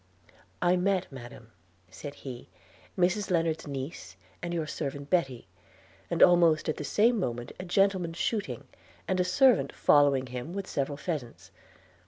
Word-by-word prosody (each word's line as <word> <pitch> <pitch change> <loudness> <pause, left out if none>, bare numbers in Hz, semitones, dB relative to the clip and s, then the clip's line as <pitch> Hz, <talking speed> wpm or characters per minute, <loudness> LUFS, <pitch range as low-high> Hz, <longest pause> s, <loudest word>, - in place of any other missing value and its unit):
'I 180 +1 +4
met, 185 -1 0
madam,' 120 -2 -11 0.4
said 145 +8 -8
he, 125 -3 -9 0.5
'Mrs 185 +3 +1
Lennard's 165 -3 0
niece 135 - -6 0.3
and 175 - -4
your 165 -2 -1
servant 140 -1 -5
Betty, 135 -10 0 0.6
and - - +4
almost 170 -3 +5
at 155 - -1
the - - -4
same 225 - +3
moment 120 -8 -3
a 185 - -5
gentleman 185 -2 +1
shooting, 205 +4 -2 0.4
and 190 -2 0
a - - +4
servant 180 - +4
following 140 -3 +4
him 125 +6 -6
with 200 0 -4
several 140 -4 -2
pheasants. 145 -9 -5
165 Hz, 145 wpm, -29 LUFS, 135-180 Hz, 0.6 s, almost